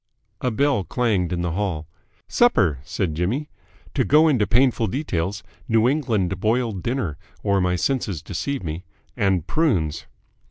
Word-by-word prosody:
A 125 - +1
bell 130 -2 +1
clanged 95 -2 0
in 85 -1 -1
the 85 - -1
hall. 85 -4 -2 0.4
"Supper!" 95 - +3
said 85 +2 -2
Jimmy. 105 - -2 0.4
"To 135 - +2
go 150 +8 +5
into 125 -9 +2
painful 120 -2 +3
details, 100 - -2 0.2
New 115 -1 +3
England 110 - 0
boiled 110 -2 0
dinner, 115 - -2 0.2
or 100 -2 +2
my 90 0 +1
senses 100 - -1
deceive 140 - -3
me, 80 +2 -4 0.3
and 95 -5 +1
prunes." 85 - 0
105 Hz, 145 wpm, -23 LUFS, 90-125 Hz, 0.4 s, go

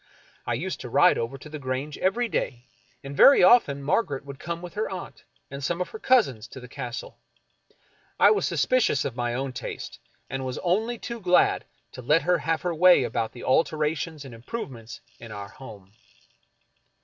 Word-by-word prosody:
I - - 0
used - - -4
to - - -7
ride - - +4
over 115 +4 -3
to 135 - -12
the 155 0 -7
Grange 135 +2 -4
every 235 +6 +1
day, 125 - -3 0.4
and 140 +1 -7
very 275 - +7
often 145 - +5
Margaret 140 -3 0
would 140 -1 -9
come 170 0 -4
with 175 0 -9
her 215 +1 -2
aunt 190 -2 -8 0.3
and 140 0 -7
some 170 +5 -1
of 180 - -2
her 440 - -9
cousins 135 - +2
to 130 - -10
the 125 - -11
Castle. 125 0 -7 1.0
I - - +7
was 430 - +1
suspicious 255 -1 +1
of 125 - -3
my 120 -1 -2
own 135 0 -3
taste, - - -7 0.3
and 135 0 -4
was 130 -1 -4
only 220 +7 0
too 235 0 -6
glad 180 -3 +3 0.3
to - - -9
let 150 +6 +2
her 180 +1 +2
have 160 0 -1
her 175 -1 -1
way 180 -2 +6
about 115 -1 -2
the 120 - -10
alterations 155 +1 0
and 130 - -10
improve 135 - -6
ments 115 -1 -11 0.2
in 115 -2 -10
our 100 -1 -7
home. 110 -8 -13
140 Hz, 190 wpm, -26 LUFS, 125-180 Hz, 1.0 s, very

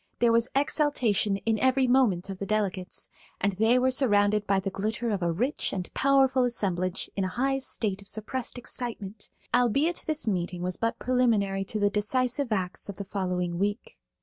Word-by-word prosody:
There 235 -1 +3
was 230 +1 +3
exaltation 255 -9 +1
in 220 +2 -1
every 260 +2 +3
movement 220 -8 +2
of 190 - -8
the 200 - -3
delegates, 195 -3 -2 0.3
and 200 0 +1
they 220 +6 +3
were 260 +1 +3
surrounded 210 -5 +3
by 195 -1 +3
the 195 0 -3
glitter 220 +4 -2
of 200 -2 -1
a 170 -1 +1
rich 245 - -1
and 185 -2 -5
powerful 270 -1 +3
assemblage 185 -7 0
in 195 - -1
a - - 0
high 270 +2 +1
state 210 -7 -2
of 200 - -13
suppressed 235 +5 -3
excitement, 225 -4 -4 0.2
albeit 275 +8 +2
this 310 -5 0
meeting 180 -3 -2
was 180 0 -2
but 230 +1 -1
preliminary 220 -6 +1
to 215 - -2
the 205 -1 +2
decisive 250 +5 0
acts 190 -1 -2
of 200 - -6
the 200 - -5
following 180 -3 -2
week. 205 - -3
215 Hz, 180 wpm, -27 LUFS, 195-250 Hz, 0.3 s, There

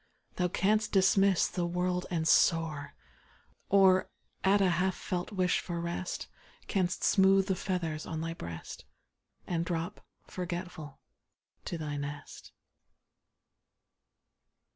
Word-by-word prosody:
Thou 180 - +2
canst 215 +4 +1
dismiss 195 -1 +4
the 175 -2 -2
world 180 +1 -1
and 160 -2 -1
soar, 160 - +2 0.7
Or, 190 -1 +5 0.3
at 195 +2 +4
a 195 - +4
half 180 +2 +1
felt 180 0 -4
wish 185 -3 +1
for 170 -1 -4
rest. 170 +1 -4 0.4
Canst 185 -2 -1
smooth 195 0 +5
the 190 - 0
feathers 170 -5 -3
on 160 - -4
thy 165 +1 -3
breast, 85 - -8 0.6
And 170 -1 -1
drop, 170 -1 -4 0.2
forgetful, 175 -5 -6 0.7
to 170 - -3
thy 150 -2 -4
nest. 145 0 -7
180 Hz, 115 wpm, -31 LUFS, 165-190 Hz, 0.7 s, Or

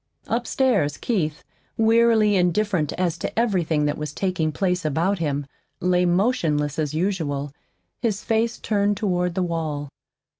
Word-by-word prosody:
Upstairs, 235 - +1
Keith, 155 -10 -1 0.3
wearily 225 -2 +4
indifferent 180 -3 +1
as 175 -2 -1
to - - -4
everything 175 -10 +1
that 150 0 -1
was 150 -1 -4
taking 170 -3 -1
place 180 +1 0
about 165 +6 0
him, 145 -3 -1 0.3
lay 180 0 +2
motionless 170 - +1
as 155 -1 -1
usual, 155 -6 -1 0.5
his 215 -3 -1
face 225 +1 0
turned 205 -1 0
toward 180 -4 0
the 185 - +1
wall. 155 -4 -3
180 Hz, 135 wpm, -23 LUFS, 155-210 Hz, 0.5 s, wearily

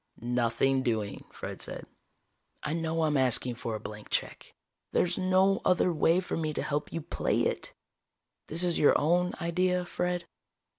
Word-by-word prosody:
"Nothing 120 +2 +1
doing," 110 -5 -2
Fred - - -7
said. - - -5 0.8
"I 150 - -2
know 165 0 -1
I'm 150 -2 +2
asking 125 -1 +3
for 115 -1 -4
a - - -4
blank 105 0 -9
check. - - -3 0.4
There's 175 0 +1
no 190 +1 +3
other 180 0 +3
way 165 +2 +3
for 185 - -3
me 155 -2 -2
to - - -1
help 150 0 -2
you 165 - -3
play - - -1
it." - - -2 0.7
"This 165 +3 +2
is 175 -2 +1
your 145 - +5
own 175 +4 +2
idea, 180 +1 +1
Fred?" 180 0 -2
160 Hz, 160 wpm, -29 LUFS, 130-180 Hz, 0.8 s, your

